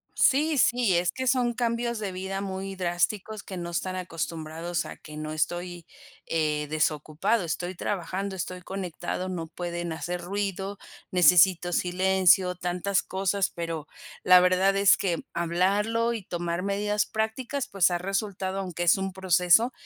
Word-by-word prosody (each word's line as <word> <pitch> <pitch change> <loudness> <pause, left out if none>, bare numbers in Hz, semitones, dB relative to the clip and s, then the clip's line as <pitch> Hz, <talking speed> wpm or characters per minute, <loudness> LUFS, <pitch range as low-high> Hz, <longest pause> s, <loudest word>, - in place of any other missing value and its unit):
Sí, 300 +2 +3
sí, 235 -8 +3
es 175 0 +1
que 260 0 -3
son 245 -1 +2
cambios 235 0 -1
de 200 -3 -3
vida 190 +1 -4
muy 195 0 -5
drásticos, 190 +4 -1
que 190 - -8
no 175 -1 -5
están 185 +2 -2
acostumbrados 165 -1 -4
a - - -8
que 155 - -12
no 155 0 -5
estoy, 175 +2 -3 0.4
eh, 150 -2 0
desocupado, 155 +6 0
estoy 175 +2 -3
trabajando, 190 +1 -3
estoy 180 0 -5
conectado, 185 -1 -4
no 170 -3 -4
pueden 175 0 -4
hacer 175 +2 -4
ruido, 195 +1 -3 0.3
necesito 180 0 +5
silencio, 185 0 +3
tantas 180 +2 0
cosas. 195 0 0
Pero 165 -3 -4 0.4
la 180 0 +8
verdad 185 +2 +3
es 200 0 +5
que 175 -4 -1
hablarlo 200 +7 +1
y 220 -4 -5
tomar 175 0 -3
medidas 205 +1 0
prácticas, 235 +5 -2
pues, 195 -5 +3
ha 175 - 0
resultado, 195 0 -2
aunque 180 -2 -3
es 170 +2 +5
un 190 0 -3
proceso. 190 +5 +4
185 Hz, 150 wpm, -27 LUFS, 175-200 Hz, 0.4 s, la